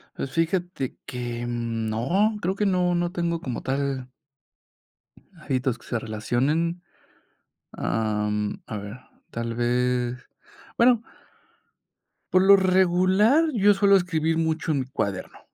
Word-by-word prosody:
Pues, 135 - -5
fíjate 165 -4 -2
que, 120 -2 -5
mm, 115 -2 -3
no, 180 - +1
creo 190 0 -1
que 210 - 0
no 180 -2 +2
no 175 0 0
tengo 170 -1 -1
como 125 -3 -4
tal 135 -1 -2 1.3
hábitos 130 -4 -1
que - - -19
se 120 - -2
relacionen. 135 +11 -1 0.9
Am, 105 -1 -2
a 110 - -5
ver, 100 +4 -8 0.3
tal 115 0 -4
vez, 125 +1 0 0.6
bueno 235 -1 +4 1.3
por 185 0 +5
lo 200 +1 +8
regular, 190 - +3
yo 205 -1 +5
suelo 200 0 +4
escribir 165 -3 0
mucho 160 0 0
en 140 -3 +1
mi - - -5
cuaderno, 100 -8 -4
140 Hz, 125 wpm, -25 LUFS, 120-180 Hz, 1.3 s, lo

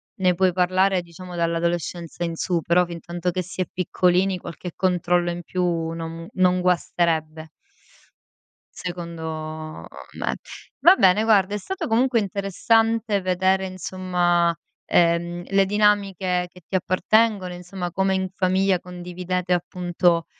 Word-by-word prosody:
ne 180 -2 +2
puoi 185 0 +2
parlare 185 +1 +2
diciamo 175 +1 -11
dall'adolescenza 170 0 -2
in 165 -1 -2
su, 170 0 -1
però 180 +2 +3
fintanto 175 +1 -4
che 185 - -2
si 185 +1 -5
è - - +1
piccolini, 185 +1 +1
qualche 175 0 -8
controllo 175 -1 +1
in 175 0 -5
più 180 +2 -2 0.3
non, 165 0 -5
mhmm, 165 0 -8
non 180 -1 +3
guasterebbe 165 -3 0 1.3
secondo 160 -3 -6 0.3
me. - - -1 0.4
Va 360 +3 +7
bene, 190 - +4
guarda, 205 -3 +3
è 210 - 0
stato 380 - -4
comunque 240 +1 +2
interessante 215 +2 +1
vedere, 190 +1 +1
insomma, 180 -2 0 0.3
ehm, 175 +1 +2
le 195 0 +3
dinamiche 195 -3 +1
che 180 - -16
ti - - -18
appartengono. 190 +1 +2
Insomma, 180 0 -6
come 190 +1 +1
in 190 0 -1
famiglia 190 0 +2
condividete, 180 0 -3
appunto, 175 -1 +1
180 Hz, 130 wpm, -23 LUFS, 175-190 Hz, 1.3 s, Va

